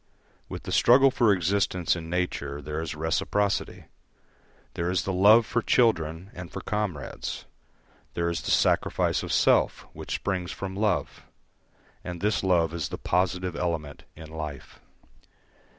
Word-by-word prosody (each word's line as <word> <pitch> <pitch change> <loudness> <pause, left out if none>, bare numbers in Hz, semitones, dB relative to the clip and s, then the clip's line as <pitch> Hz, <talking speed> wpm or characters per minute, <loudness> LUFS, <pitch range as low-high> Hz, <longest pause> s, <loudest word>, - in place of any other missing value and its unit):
With - - -7
the - - -6
struggle 135 +3 +6
for 115 -4 +3
existence 95 -1 +1
in 80 -1 -7
nature 85 -5 -2
there 75 +2 -4
is 80 -2 -5
reciprocity. 95 +6 -1 0.9
There 85 +1 -2
is 90 0 0
the 95 - -2
love 105 +5 +6
for 115 +3 0
children 90 -7 +1
and 90 -1 -9
for - - -6
comrades; 100 -10 -4 0.7
there 85 0 0
is 85 -1 -2
the - - -5
sacrifice - - +2
of - - -5
self, - - +3
which - - -5
springs 90 -3 -2
from 95 -1 -6
love; 105 +1 -1 0.8
and 90 -1 -6
this 105 +3 +1
love 85 -3 +2
is 80 -4 -3
the - - -5
positive 90 0 -1
element 80 -5 -3
in 80 -1 -11
life. 75 -3 -7
90 Hz, 145 wpm, -26 LUFS, 80-100 Hz, 0.9 s, struggle